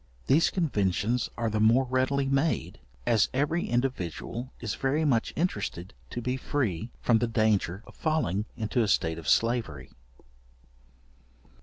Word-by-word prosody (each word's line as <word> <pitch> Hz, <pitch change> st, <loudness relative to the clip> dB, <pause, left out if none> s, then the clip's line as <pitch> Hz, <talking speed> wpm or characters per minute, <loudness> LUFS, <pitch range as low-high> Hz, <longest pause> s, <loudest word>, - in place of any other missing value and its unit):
These 150 Hz, +5 st, +4 dB
conventions 115 Hz, -, 0 dB
are 115 Hz, -2 st, -1 dB
the 110 Hz, -, 0 dB
more 115 Hz, +5 st, +5 dB
readily 130 Hz, +2 st, +1 dB
made, 135 Hz, +4 st, 0 dB, 0.3 s
as 115 Hz, -4 st, +3 dB
every 150 Hz, +5 st, 0 dB
individual 120 Hz, -, -2 dB
is 110 Hz, -3 st, -3 dB
very 145 Hz, +4 st, 0 dB
much 120 Hz, -6 st, +2 dB
interested 105 Hz, -, -2 dB, 0.2 s
to 120 Hz, -, -5 dB
be 125 Hz, +2 st, -1 dB
free 115 Hz, -, -2 dB
from 115 Hz, -2 st, +4 dB
the 120 Hz, -, +1 dB
danger 110 Hz, -4 st, +1 dB
of -, -, -14 dB
falling 130 Hz, -, 0 dB
into 110 Hz, +2 st, 0 dB
a 110 Hz, -, +2 dB
state 80 Hz, -4 st, +1 dB
of 80 Hz, -, -4 dB
slavery. 110 Hz, -, +1 dB
120 Hz, 140 wpm, -28 LUFS, 105-135 Hz, 0.3 s, more